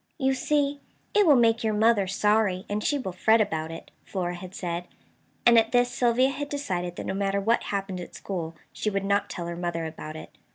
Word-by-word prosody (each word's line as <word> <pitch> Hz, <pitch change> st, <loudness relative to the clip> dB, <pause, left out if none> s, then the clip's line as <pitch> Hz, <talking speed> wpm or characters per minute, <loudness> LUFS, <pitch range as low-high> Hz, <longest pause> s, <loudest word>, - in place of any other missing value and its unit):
"You 265 Hz, -3 st, +2 dB
see, 285 Hz, +1 st, 0 dB, 0.3 s
it 415 Hz, -3 st, +4 dB
will 295 Hz, -, +7 dB
make 230 Hz, -2 st, +3 dB
your 215 Hz, -1 st, +1 dB
mother 215 Hz, -2 st, +3 dB
sorry, 205 Hz, -1 st, +1 dB
and 210 Hz, +1 st, -2 dB
she 290 Hz, -, +1 dB
will 235 Hz, -9 st, -4 dB
fret 220 Hz, +5 st, +3 dB
about 160 Hz, -7 st, -1 dB
it," 165 Hz, -, -9 dB
Flora 180 Hz, -2 st, -3 dB
had 180 Hz, +1 st, -9 dB
said; 175 Hz, 0 st, -4 dB, 0.6 s
and 235 Hz, -1 st, +8 dB
at 225 Hz, +2 st, -1 dB
this 245 Hz, 0 st, +3 dB
Sylvia 245 Hz, +1 st, +3 dB
had 285 Hz, +1 st, -4 dB
decided 180 Hz, -12 st, -3 dB
that -, -, -6 dB
no -, -, -2 dB
matter 195 Hz, 0 st, 0 dB
what 225 Hz, +4 st, +1 dB
happened 195 Hz, -2 st, -3 dB
at 175 Hz, -, -9 dB
school 165 Hz, -4 st, -5 dB, 0.2 s
she 215 Hz, -, -1 dB
would 195 Hz, -1 st, -2 dB
not 200 Hz, +1 st, +1 dB
tell 170 Hz, -, -5 dB
her 170 Hz, 0 st, -4 dB
mother 170 Hz, -1 st, -3 dB
about 155 Hz, -1 st, -7 dB
it. 155 Hz, -, -9 dB
200 Hz, 215 wpm, -26 LUFS, 180-235 Hz, 0.6 s, and